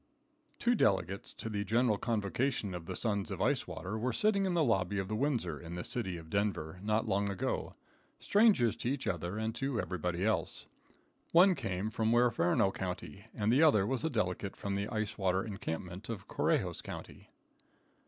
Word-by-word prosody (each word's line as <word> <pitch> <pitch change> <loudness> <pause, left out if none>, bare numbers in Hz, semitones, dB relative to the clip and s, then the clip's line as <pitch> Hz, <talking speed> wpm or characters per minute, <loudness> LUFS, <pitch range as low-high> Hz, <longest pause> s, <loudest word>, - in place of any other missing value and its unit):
Two 240 - +2
delegates 95 - +1
to - - -6
the 105 -2 -2
General 115 +2 +2
Convocation 105 0 -1
of 85 -2 -6
the - - -4
Sons 100 -4 -1
of - - -4
Ice - - +1
Water 105 +4 -4
were 125 +3 0
sitting 200 - +2
in 180 - 0
the 165 - +4
lobby 100 -6 +1
of 95 -1 -1
the 110 - -2
Windsor, 115 - 0
in 85 0 -7
the 90 - -4
city 95 -8 -3
of 80 -1 -11
Denver, 95 -4 -1
not 110 +2 0
long 100 +1 +1
ago, 100 - -2 0.4
strangers 200 - +4
to 120 - -2
each 140 -2 -2
other 90 -1 -2
and 110 +1 -1
to 130 0 -2
everybody 90 0 -2
else. 110 - 0 0.7
One 185 +3 +7
came 100 - -3
from 110 +1 +1
Huerferno 110 -6 +3
county, 95 +2 -5
and 110 +2 +2
the 135 - +5
other 125 -12 +5
was 130 +3 -1
a 160 - +1
delegate 100 - -1
from 100 - -3
the 100 +1 -1
Ice 110 -2 -3
Water 95 -1 +2
Encampment 95 -1 -5
of 115 -4 -5
Correjos - - 0
county. - - -9
105 Hz, 185 wpm, -33 LUFS, 95-120 Hz, 0.7 s, One